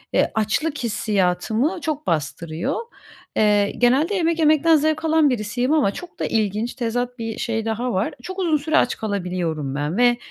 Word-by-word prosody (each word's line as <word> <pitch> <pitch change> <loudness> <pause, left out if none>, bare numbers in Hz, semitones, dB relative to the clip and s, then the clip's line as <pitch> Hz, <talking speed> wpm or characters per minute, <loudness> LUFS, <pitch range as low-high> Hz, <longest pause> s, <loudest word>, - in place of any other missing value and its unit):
e, - - +3
açlık 220 +9 0
hissiyatımı 220 - 0
çok 300 0 -3
bastırıyor. 160 +1 -2 0.6
Eee, 205 -1 +3
genelde 265 +10 +3
yemek 335 -2 +1
yemekten 315 +1 +5
zevk 315 +1 +1
alan 315 -2 +4
birisiyim 245 +4 -1
ama 280 -11 +3
çok 355 - -10
da - - -1
ilginç, 215 +1 -1
tezat 245 0 -3
bir 225 -1 -4
şey 225 -1 -2
daha 230 +2 -2
var. 190 +3 -1
Çok 375 +1 -6
uzun 335 -5 +2
süre 315 +2 0
aç 250 - +2
kalabiliyorum 180 -9 -3
ben 150 +5 -2
ve 240 0 +4
240 Hz, 165 wpm, -22 LUFS, 205-310 Hz, 0.6 s, yemekten